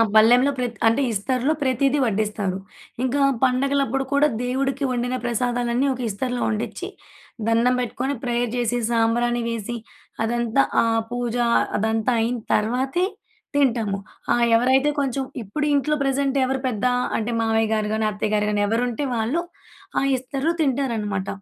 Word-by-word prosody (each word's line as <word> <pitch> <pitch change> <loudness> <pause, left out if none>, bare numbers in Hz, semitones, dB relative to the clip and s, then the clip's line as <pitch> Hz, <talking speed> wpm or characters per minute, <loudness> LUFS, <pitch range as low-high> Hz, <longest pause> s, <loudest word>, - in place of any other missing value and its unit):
బల్లెంలో 245 +6 +6
ప్రతి 245 -2 -3
అంటే 230 +5 +3
ఇస్తరులో 255 +7 0
ప్రతీదీ 275 +2 +2
వడ్డిస్తారు. 210 -3 -1 0.5
ఇంకా 270 +2 +1 0.2
పండగలప్పుడు 270 0 +1
కూడా 290 +2 +5 0.2
దేవుడికి 270 +2 -1
వండిన 245 +1 -1
ప్రసాదాలన్నీ 245 +2 0
ఒక 255 - -7
ఇస్తరులో 245 +4 -3
వండిచ్చి. 215 0 -3 0.6
దండం 230 +2 +3
పెట్టుకొని 250 +3 -2
ప్రేయర్ 240 -1 0
చేసి 245 0 0
సాంబ్రాణి 240 +1 +2
వేసి 230 +1 -4 0.5
అదంతా 235 +3 +1 0.2
ఆ - - +1 0.3
పూజ 245 -1 -2 0.4
అదంతా 220 +3 0
అయిన 240 +2 0 0.2
తర్వాతే 260 +11 +1 0.5
తింటాము. 230 -8 +2 0.4
ఆ - - +3 0.2
ఎవరైతే 260 +4 +3
కొంచెం 270 -1 -1 0.2
ఇప్పుడు 295 +10 -3
ఇంట్లో 300 +2 +1
ప్రెజెంట్ 275 0 0
ఎవరు 265 0 -1
పెద్ద 220 -2 -2 0.3
అంటే 230 +2 -2
మావయ్య‌గారు 220 -1 +1
గాని, 220 0 0
అత్తయ్య‌గారు 210 0 0
గానీ 205 0 +1
ఎవరుంటే 240 +4 -1
వాళ్ళు 230 +10 0 0.6
ఆ - - 0
ఇస్తరు‌లో 275 +5 -2
తింటారనమాట. 230 -8 -1
245 Hz, 130 wpm, -23 LUFS, 225-270 Hz, 0.6 s, బల్లెంలో